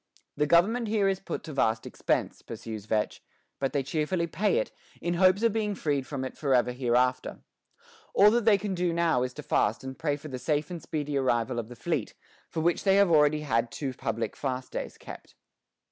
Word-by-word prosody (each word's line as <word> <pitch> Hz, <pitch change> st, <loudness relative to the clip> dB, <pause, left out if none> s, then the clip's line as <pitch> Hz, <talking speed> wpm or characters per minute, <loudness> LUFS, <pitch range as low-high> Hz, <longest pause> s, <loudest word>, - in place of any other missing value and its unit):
"The 150 Hz, +1 st, +1 dB
government 215 Hz, +9 st, +3 dB
here 210 Hz, -2 st, +2 dB
is 190 Hz, -1 st, +1 dB
put -, -, -5 dB
to 155 Hz, -, -7 dB
vast 110 Hz, -4 st, +1 dB
expense," -, -, -1 dB
pursues 110 Hz, -2 st, -7 dB
Vetch, 110 Hz, -1 st, -1 dB, 0.4 s
"but 135 Hz, -2 st, 0 dB
they 140 Hz, -1 st, 0 dB
cheerfully 155 Hz, +5 st, -1 dB
pay 185 Hz, -, +1 dB
it, -, -, -1 dB, 0.3 s
in 175 Hz, -, -1 dB
hopes 185 Hz, +4 st, +4 dB
of 230 Hz, -3 st, +3 dB
being 210 Hz, -2 st, -1 dB
freed 145 Hz, -6 st, -1 dB
from 135 Hz, -3 st, -4 dB
it 130 Hz, -, -6 dB
forever 130 Hz, -4 st, +2 dB
hereafter. 125 Hz, 0 st, 0 dB, 0.7 s
All 205 Hz, +1 st, +7 dB
that 235 Hz, +1 st, +2 dB
they 215 Hz, -3 st, +6 dB
can 200 Hz, 0 st, -3 dB
do 175 Hz, -1 st, 0 dB
now 165 Hz, -6 st, +2 dB
is 125 Hz, 0 st, -2 dB
to -, -, -7 dB
fast 110 Hz, +5 st, +1 dB
and 130 Hz, 0 st, -6 dB
pray 150 Hz, -3 st, 0 dB
for 150 Hz, -, -10 dB
the 130 Hz, -2 st, -5 dB
safe 150 Hz, +3 st, -1 dB
and 170 Hz, -2 st, -5 dB
speedy 150 Hz, -2 st, -3 dB
arrival 120 Hz, -2 st, +1 dB
of 115 Hz, -1 st, -6 dB
the 125 Hz, -, -9 dB
fleet, 150 Hz, -3 st, -2 dB, 0.3 s
for 160 Hz, -, -3 dB
which 170 Hz, +1 st, +1 dB
they 195 Hz, -1 st, +4 dB
have 200 Hz, -3 st, +5 dB
already 150 Hz, -1 st, +4 dB
had 115 Hz, -5 st, 0 dB
two 135 Hz, -3 st, -4 dB
public 115 Hz, -1 st, -3 dB
fast 130 Hz, -2 st, -4 dB
days -, -, -5 dB
kept." -, -, -11 dB
150 Hz, 205 wpm, -28 LUFS, 125-180 Hz, 0.7 s, All